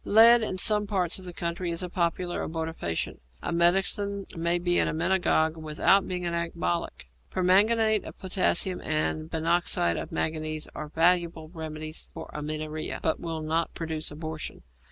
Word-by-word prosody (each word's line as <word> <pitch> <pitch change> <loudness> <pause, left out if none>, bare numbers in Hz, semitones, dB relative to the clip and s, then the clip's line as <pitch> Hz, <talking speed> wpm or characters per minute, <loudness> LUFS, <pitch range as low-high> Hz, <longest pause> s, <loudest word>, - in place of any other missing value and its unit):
Lead 230 +3 +7
in 200 -4 -2
some 210 +2 +2
parts 185 -4 0
of 185 - -9
the 180 - -6
country 170 +1 -3
is 170 +2 -2
a - - -2
popular 175 0 -1
abortifacient. 160 - -3 0.2
A - - -2
medicine 195 +3 +2
may 170 +1 +1
be 175 0 +1
an - - +2
emmenagogue 165 -1 +2
without 160 +5 +3
being 180 -1 -3
an 170 - -1
ecbolic. 170 - -2 0.2
Permanganate 215 +4 +3
of - - -9
potassium 185 -1 +1
and 155 0 -1
binoxide 165 - +1
of - - -5
manganese 155 -1 -2
are 155 - -6
valuable 165 -1 +2
remedies 155 -2 -6
for - - -8
amenorrhoea, 155 +1 -4
but 160 - +1
will 165 -2 -4
not 160 +2 -1
produce 160 -1 -2
abortion. 155 +1 -6
170 Hz, 155 wpm, -27 LUFS, 155-185 Hz, 0.2 s, Lead